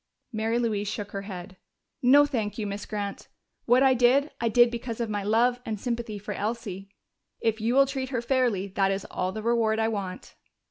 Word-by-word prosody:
Mary 225 +1 0
Louise 215 -4 -1
shook 205 0 -4
her 195 - -4
head. 185 -1 -8 0.4
"No, 280 +4 +7
thank 220 -8 -2
you, 215 - -2
Miss 200 0 -5
Grant. 205 -2 -5 0.4
What 250 +3 +5
I 265 -1 +6
did, 255 +4 +3
I 230 - +2
did 240 +1 +5
because 235 -1 -5
of 230 -2 -2
my 205 -1 -1
love 235 +4 +2
and 220 -3 -4
sympathy 235 -2 -3
for 205 +1 -6
Elsie. 200 -2 -4 0.5
If 225 -1 0
you 230 +3 +1
will 275 0 +7
treat 265 -1 -4
her 250 -4 -1
fairly, 240 -7 +1
that 195 0 +1
is 195 0 -2
all 185 0 -1
the 215 +2 -6
reward 230 -2 +2
I 220 0 +1
want." 195 -4 -5
225 Hz, 200 wpm, -27 LUFS, 205-240 Hz, 0.5 s, No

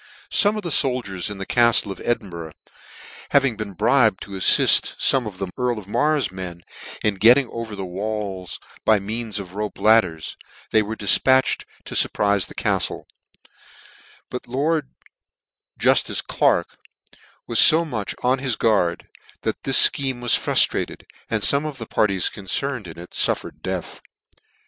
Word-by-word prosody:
Some 210 +1 +2
of 210 - -5
the 175 - -4
foldiers 115 -10 -1
in 105 - -7
the 95 - -6
caille 115 -3 +2
of - - -9
Edinburgh 90 -9 -4 0.8
having 135 -4 +2
been 105 -2 -6
bribed 110 +1 +2
to 100 - -13
aflift 95 -3 +4
fome 130 -4 +2
of 100 -3 -9
the 95 -1 -5
earl 125 -2 0
of 100 -3 -9
Mar's 150 +5 0
men 90 -2 -8 0.4
in 105 - +2
getting 125 +4 +6
over 115 -2 -6
the 95 -1 -5
walls 100 0 -5 0.2
by 110 - +4
means 110 +2 -5
of 95 -3 -8
rope 105 +1 -5
ladders, 100 -8 +1 0.3
they 110 - +4
were 110 +1 -5
difpntched 130 +6 +3 0.2
to - - -8
furpritfe 100 -2 +1
the - - -13
caftle: - - -2 1.3
but 125 - -4
the - - -23
Lord 145 +2 -1 0.9
Juftice - - +2
Clerk - - 0 0.7
was 115 - +4
fo 165 +2 +6
much 110 -10 -4
on 130 +2 +2
his 130 -4 -1
gtiard, 95 -6 +1 0.4
that - - -3
this - - +7
fcl^eme 135 -3 -4
was 120 -2 +1
fruitrated, - - +1 0.3
and 110 -2 -1
fome 140 +2 +1
of 145 -3 -7
the 115 - -7
parties 100 -5 0
concerned 110 +3 -2
in 80 - -10
it 85 +1 -11
ftirTered - - -1
death. - - -5
110 Hz, 155 wpm, -21 LUFS, 95-130 Hz, 1.3 s, this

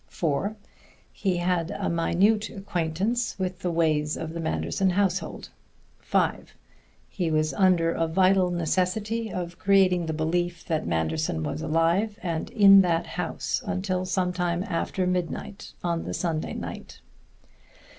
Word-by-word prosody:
(4) 170 +6 -1 0.6
He 190 -4 -1
had 175 -1 0
a 200 -1 -3
minute 195 +6 +2
acquaintance 195 +5 -2
with 185 -2 -3
the 180 - -2
ways 155 -3 +1
of 160 0 -5
the 170 - -5
Manderson 85 - 0
household. 195 +1 -1 0.5
(5) - - -1 0.5
He 175 -4 -2
was 155 0 +1
under 180 -4 +3
a 165 0 0
vital 185 +2 +3
necessity 190 +6 -1
of 175 -1 -5
creating 185 -3 +3
the 160 - -1
belief 175 +2 -1
that 160 - -1
Manderson 80 -1 -1
was 140 - -3
alive 170 +7 +1
and 165 -3 -2
in 195 -3 +8
that 170 -2 +1
house - - -3
until 185 -3 -2
some 185 -1 0
time 175 -1 -1
after 185 -1 -2
midnight 180 +3 -3
on 170 -1 -1
the - - -4
Sunday 165 -3 -2
night. - - -7
175 Hz, 135 wpm, -26 LUFS, 165-190 Hz, 0.6 s, in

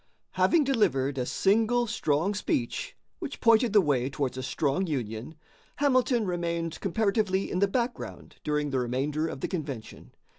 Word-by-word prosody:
Having 335 -3 +3
delivered 160 - +1
a 125 - -1
single 225 +4 +2
strong 190 -5 0
speech, 130 - -2 0.2
which 315 -6 -6
pointed 230 0 +4
the 210 -1 +6
way 135 -6 +1
towards 135 -2 -2
a 130 - -4
strong 140 +7 0
union, 120 -1 -4 0.4
Hamilton 255 -5 +2
remained 170 -2 -2
comparatively 200 -1 0
in 180 - 0
the 200 - +4
background 240 +4 -4
during 150 -1 -1
the 130 - +1
remainder 140 +6 -1
of 135 - -6
the - - -1
convention. 140 -10 -6
170 Hz, 150 wpm, -28 LUFS, 135-220 Hz, 0.4 s, the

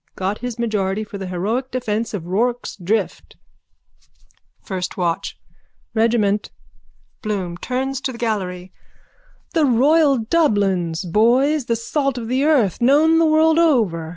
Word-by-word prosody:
Got 195 +2 -3
his 245 -1 -5
majority 215 -3 -1
for 205 -1 -9
the 190 - -5
heroic 215 +9 -2
defence 230 -3 -2
of 175 -5 -6
Rorke's 235 +7 -1
Drift. 200 +2 -3 1.3
FIRST 185 -3 -5
WATCH: 170 -3 -2 0.6
Regiment. 220 -3 +1 0.7
BLOOM: 195 -5 -3
(Turns 265 +1 -3
to 265 - -2
the 240 - -9
gallery.) 190 -6 -3 0.8
The 320 -3 +3
royal 280 +3 +4
Dublins, 200 - 0
boys, 245 - +2
the 230 - 0
salt 270 +3 -2
of 230 -2 -5
the 260 +2 +1
earth, 250 - +2
known 305 +6 +4
the 330 - +4
world 315 +1 +4
over. 215 - +2
230 Hz, 130 wpm, -20 LUFS, 195-265 Hz, 1.3 s, royal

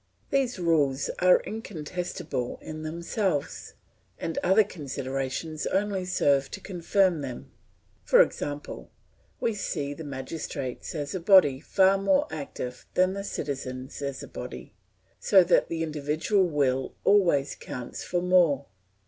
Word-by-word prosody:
These 265 -4 +1
rules 150 -6 +1
are 180 0 +5
incontestable 175 - -4
in 155 0 -7
themselves, 170 +1 -2 0.4
and 165 - -3
other 195 +4 +5
considerations 140 -2 -4
only 195 -1 0
serve 140 -6 +2
to - - -7
confirm 185 -2 +1
them. 125 - -7 0.5
For - - +5
example, 145 0 -6 0.5
we 230 - 0
see 150 -8 -3
the 160 - -8
magistrates 140 -1 -5
as 145 -2 -3
a 185 - -2
body 170 -7 +6
far 190 +5 +3
more 280 +9 +3
active 140 -4 -6
than 185 +1 +3
the 200 0 -4
citizens 135 -6 -5
as 140 -1 -4
a - - -8
body, 125 -4 -8 0.5
so 190 -3 +6
that 175 0 +3
the 165 -1 -2
individual 155 +6 +1
will 135 -4 0
always 175 -9 +4
counts 125 -1 -7
for 175 0 -1
more. 170 -7 +4
160 Hz, 130 wpm, -27 LUFS, 140-185 Hz, 0.5 s, body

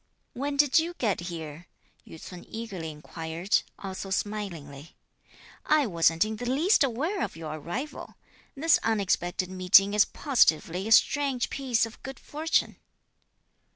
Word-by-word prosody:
"When 280 +3 -3
did 290 +2 +5
you 340 +2 -3
get 215 - -1
here?" 160 0 -8 0.4
Yü 160 - -11
ts'un 180 +1 -10
eagerly 200 -8 -6
inquired 160 +4 -2 0.2
also 195 0 -6
smilingly. 170 -8 -5 0.7
"I 305 -2 +3
wasn't 165 -3 +2
in 215 0 -5
the 245 +2 -4
least 310 - +3
aware 295 - -1
of - - -3
your 160 -2 -6
arrival. 255 - -6 0.4
This 320 +3 +3
unexpected 185 -4 -1
meeting 185 +2 +5
is 210 0 +5
positively 185 - +1
a - - -4
strange 275 +1 +3
piece 255 -5 +1
of 225 - -12
good 270 -1 -8
fortune." 315 +2 -1
210 Hz, 135 wpm, -27 LUFS, 170-270 Hz, 0.7 s, did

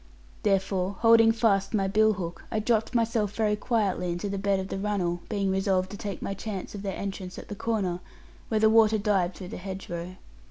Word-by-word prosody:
Therefore, 195 -2 +1
holding 225 -1 +7
fast 220 -3 +1
my 195 -2 +1
bill 215 +2 +4
hook, 175 -3 -6
I 220 - -1
dropped 220 +2 +1
myself 225 -3 +1
very 215 -2 +2
quietly 205 -5 0
into 175 +4 -3
the 200 0 -3
bed 200 -1 +1
of 190 0 -5
the 195 - -3
runnel, 185 -4 -1
being 200 -3 0
resolved 190 -1 +1
to 205 - -6
take 200 -4 -5
my 195 - -2
chance 195 -1 -6
of 205 - -6
their 195 -2 -4
entrance 190 -2 -5
at - - -9
the 205 - -5
corner, 195 -5 -1 0.5
where 220 - +1
the 220 - +5
water 220 0 +5
dived 195 -4 +1
through 185 -2 -8
the - - -6
hedge 190 +1 -7
row. 175 +2 -5
200 Hz, 210 wpm, -27 LUFS, 190-215 Hz, 0.5 s, holding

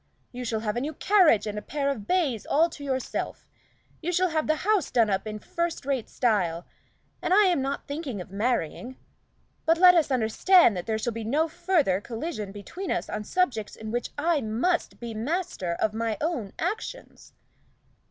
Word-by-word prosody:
You 250 0 -6
shall 225 -2 -1
have 210 -1 -2
a 240 - -1
new 300 +3 -4
carriage 355 - +4
and 210 0 -3
a - - -10
pair 280 +3 -2
of 215 -7 -6
bays 290 - 0
all 325 +4 +3
to 285 - -9
yourself; 260 -2 -3 0.5
you 345 +2 -1
shall 365 +1 +2
have 315 -1 -1
the 310 - +3
house 425 -3 +2
done 225 -4 +3
up 195 +2 -1
in 215 0 -4
first 340 +6 -3
rate 270 -5 -1
style, 180 -8 0 0.6
and - - -2
I 420 - +7
am 355 -7 +2
not 275 +1 -3
thinking 285 - -4
of 180 - -8
marrying. 235 +3 -2 0.7
But 330 +1 +3
let 360 +1 +8
us 330 -4 +3
understand 255 - +4
that 180 - -5
there 220 -1 0
shall 230 +2 -2
be 225 0 -5
no 290 +9 +1
further 330 - +1
collision 225 - -5
between 275 - -7
us - - -1
on 210 - -3
subjects 250 - -1
on 220 0 -6
which 240 0 -2
I 315 0 +1
must 250 +11 -1
be 235 -1 -6
master 225 - -2
of 210 +5 0
my 225 -1 -1
own 295 - -2
actions." 430 +8 -5
260 Hz, 190 wpm, -26 LUFS, 220-335 Hz, 0.7 s, let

